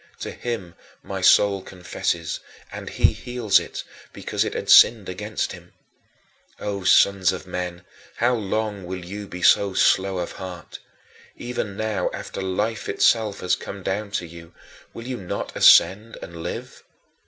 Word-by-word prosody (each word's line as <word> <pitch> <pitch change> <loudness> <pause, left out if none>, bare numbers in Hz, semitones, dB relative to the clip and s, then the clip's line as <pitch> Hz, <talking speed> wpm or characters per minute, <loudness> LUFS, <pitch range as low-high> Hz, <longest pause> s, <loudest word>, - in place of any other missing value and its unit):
To - - -4
him 110 -8 -5 0.3
my - - -5
soul 100 -1 +5
confesses, 85 -2 -3 0.3
and - - -7
he - - +3
heals 120 -5 +1
it, - - -7 0.3
because - - -2
it - - -4
had - - -4
sinned 110 -4 +7
against 105 +4 -3
him. - - -12 0.9
O 100 -2 -4
sons 95 -1 +4
of 95 - -6
men, 90 0 -5 0.3
how 120 +2 +2
long 105 -2 -2
will 90 -1 -6
you 100 +3 -7
be 90 -1 -8
so 100 -2 +4
slow 95 0 +3
of 90 -1 -3
heart? 90 -3 -9 0.6
Even 115 -5 -4
now 110 -2 -1
after - - -6
Life 105 +3 -2
itself 110 -3 +2
has 90 - +2
come 100 -1 -8
down 100 +3 -2
to 90 - -2
you, 85 0 -13 0.4
will 115 - -9
you 125 0 -4
not 95 -4 -5
ascend 105 +4 +5
and 85 -1 -9
live? - - -6
100 Hz, 155 wpm, -23 LUFS, 90-110 Hz, 0.9 s, sinned